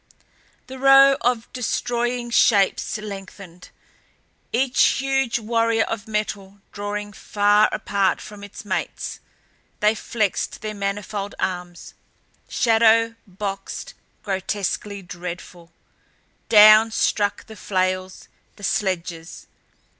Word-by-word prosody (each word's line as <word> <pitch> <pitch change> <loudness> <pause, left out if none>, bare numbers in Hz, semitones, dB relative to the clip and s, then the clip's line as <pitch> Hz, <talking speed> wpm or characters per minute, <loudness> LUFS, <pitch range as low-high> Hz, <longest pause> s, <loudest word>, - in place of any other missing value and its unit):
The 260 0 -10
row 275 +1 +7
of 240 -2 0
destroying 240 0 -2
shapes 205 -2 +3
lengthened, 195 -3 -10 0.8
each 250 +1 +1 0.2
huge 270 -3 0
warrior 230 0 +1
of 225 -1 -5
metal 205 -2 -4
drawing 205 0 -5
far 205 +1 +2
apart 195 -2 0
from 210 -1 -11
its 205 +1 -10
mates. 190 -1 -4 0.6
They 210 +1 +3
flexed 215 -2 -2
their 215 0 -4
manifold 200 0 -4
arms, 180 -2 -4 0.6
shadow 230 0 +3
boxed 195 +1 -6 0.3
grotesquely, 200 0 -3
dreadfully. 175 -1 -8 0.8
Down 215 +1 +8
struck 205 -2 0
the 220 - -12
flails, 185 -2 -2 0.3
the 205 - -16
sledges. 175 -5 -3
210 Hz, 95 wpm, -22 LUFS, 195-230 Hz, 0.8 s, Down